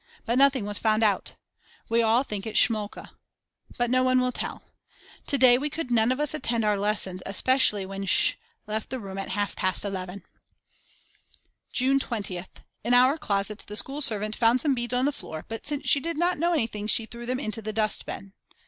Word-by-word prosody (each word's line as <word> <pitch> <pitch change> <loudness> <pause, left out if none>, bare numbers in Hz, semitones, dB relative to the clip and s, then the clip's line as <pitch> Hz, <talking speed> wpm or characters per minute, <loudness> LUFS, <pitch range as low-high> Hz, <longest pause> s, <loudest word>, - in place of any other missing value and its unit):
But 235 +3 +1
nothing 270 -5 +4
was 205 0 -2
found 220 0 +2
out. 205 -3 +1 0.5
We 230 +1 +2
all 230 +3 +3
think 210 -5 -5
it 220 - -5
is - - +1
Schmolka. 215 -4 +1 0.7
But 240 0 0
no 255 0 +4
one 255 0 +3
will 250 0 +1
tell. - - -5 0.6
To 280 - +1
day 250 -1 +6
we 295 +2 -2
could 295 -4 -5
none 230 0 +3
of 255 - -1
us 295 -1 -1
attend 235 -7 0
to 210 - +2
our 205 -1 +1
lessons 200 -3 -1
especially 210 0 +2
when 195 +1 -6
Sch. - - +3 0.3
left 215 0 -4
the 260 - -4
room 195 -3 -7
at 195 - -5
half 205 +1 -2
past 185 +2 0
11. 190 -1 -5 1.5
June 270 +2 +2
20th. 200 -8 -4 0.2
In 240 +3 +3
our 255 +3 +5
closet 200 -1 -1
the 210 - -7
school 275 +7 0
servant 215 -4 0
found 235 +2 +3
some 290 -3 +2
beads 240 -1 -2
on 250 +1 +2
the 290 - +2
floor 160 - -8
but 225 +4 -6
since 290 -2 -2
she 280 - +5
did 330 +2 -3
not 350 0 +1
know 340 +2 +2
anything 220 -8 -1
she 225 +1 +2
threw 235 +1 -9
them 255 +1 -1
into 220 -4 -3
the 215 0 -4
dustbin. 215 -2 -2
225 Hz, 205 wpm, -26 LUFS, 205-255 Hz, 1.5 s, day